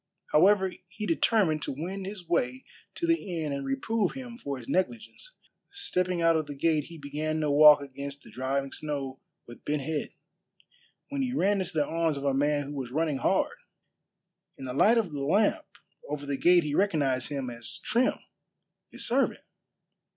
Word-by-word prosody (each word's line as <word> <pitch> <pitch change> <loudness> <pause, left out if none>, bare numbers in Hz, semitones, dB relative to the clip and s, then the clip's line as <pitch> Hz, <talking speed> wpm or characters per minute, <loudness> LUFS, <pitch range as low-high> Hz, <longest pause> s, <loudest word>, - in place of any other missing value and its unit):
However, 190 +3 +4
he 205 +3 -6
determined 170 -3 +2
to - - -3
wend 190 +5 -4
his 195 -4 -8
way 130 -6 0 0.3
to 340 - -2
the 335 0 +2 0.2
inn 150 -3 -2
and 140 0 -3
reprove 180 +10 -1
him 250 -3 -8
for 140 - -5
his 120 - -11
negligence. 230 - -2 0.4
Stepping 185 - -1
out 165 0 +5
of 155 -2 0
the 145 - -6
gate 155 0 +1
he 170 - -11
began 155 +2 -3
to 150 -1 +1
walk 150 0 +8
against 140 0 -7
the - - -14
driving 135 +2 -2
snow 140 -3 -4 0.3
with 120 - -13
bent 150 -1 -1
head, 155 +1 -2 1.0
when 280 -1 -2
he 255 -1 -1
ran 200 -4 +2
into 185 - -5
the 150 -2 +2
arms 165 -2 0
of 140 - -5
a 140 - +2
man 145 +1 +1
who 140 +1 -7
was 135 -4 -4
running 150 +1 0
hard. - - +1 1.0
In 135 - -7
the 125 - -4
light 220 - +5
of 210 -7 0
the 145 - -5
lamp 200 +10 +2 0.4
over 145 -1 -4
the 140 0 -2
gate 175 +5 +5
he 150 -1 -3
recognized 145 -9 +1
him 135 -4 -3
as 115 -1 -3
Trim, 245 +3 +1 0.7
his - - -4
servant. 265 +4 +1
155 Hz, 180 wpm, -28 LUFS, 140-190 Hz, 1.0 s, walk